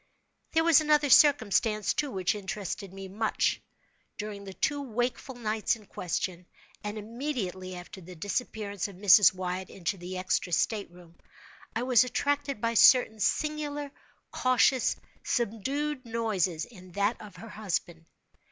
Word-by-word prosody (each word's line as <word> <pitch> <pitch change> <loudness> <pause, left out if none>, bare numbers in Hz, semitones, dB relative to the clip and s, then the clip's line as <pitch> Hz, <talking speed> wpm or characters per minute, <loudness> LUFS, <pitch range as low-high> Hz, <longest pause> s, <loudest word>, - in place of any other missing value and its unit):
There 325 0 +3
was 330 -2 +6
another 300 -2 +3
circumstance, 220 -6 +4
too, 295 - -1
which 190 -5 0
interested 200 -1 -5
me 195 0 -8
much. 215 +3 0 0.6
During 210 -1 -6
the 195 - -8
two 290 -2 0
wakeful 245 +1 -3
nights 220 -1 0
in 215 -2 -16
question, 180 -1 -4 0.4
and 210 +1 -4
immediately 210 -6 -4
after 180 +2 -10
the 180 +1 -11
disappearance 205 +1 -3
of 200 - -11
Mrs. 195 -1 +7
Wyatt 185 0 -4
into 195 +1 -3
the 180 +1 -6
extra 185 -1 -1
state 210 +4 0
room, 175 -1 -17 0.6
I 230 - 0
was 250 -1 +5
attracted 280 +1 -1
by 230 +1 0
certain 230 -1 +6
singular 295 +2 -1 0.4
cautious, 255 0 +3 0.3
subdued 260 +6 -2
noises 215 -8 -1
in 185 -7 -15
that 205 +4 0
of 210 -3 -11
her 215 +5 -10
husband. 175 -6 -4
215 Hz, 140 wpm, -29 LUFS, 185-255 Hz, 0.6 s, Mrs